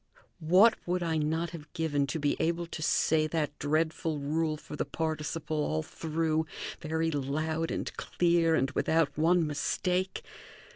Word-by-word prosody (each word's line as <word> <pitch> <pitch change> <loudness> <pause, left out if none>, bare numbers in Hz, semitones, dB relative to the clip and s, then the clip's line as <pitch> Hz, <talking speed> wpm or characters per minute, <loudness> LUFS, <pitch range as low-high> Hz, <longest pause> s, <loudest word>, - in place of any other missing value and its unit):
What 185 +8 +6
would 180 0 0
I 165 -1 0
not 160 +3 -1
have 155 -3 -10
given 150 -5 0
to 140 - -2
be 145 -2 +1
able 170 +1 0
to 165 -1 -7
say 155 0 +2
that 155 -2 -2
dreadful 155 +1 0
rule 155 +2 -1
for 150 - -9
the - - -1
participle 155 +1 -3
all 80 - -1
through, 160 0 -1 0.3
very 160 +1 -1
loud 155 +3 -1
and - - -3
clear, 170 -2 +2
and 135 -2 +1
without 160 0 +1
one 165 +2 +3
mistake? 180 +5 -1
160 Hz, 150 wpm, -30 LUFS, 150-165 Hz, 0.3 s, What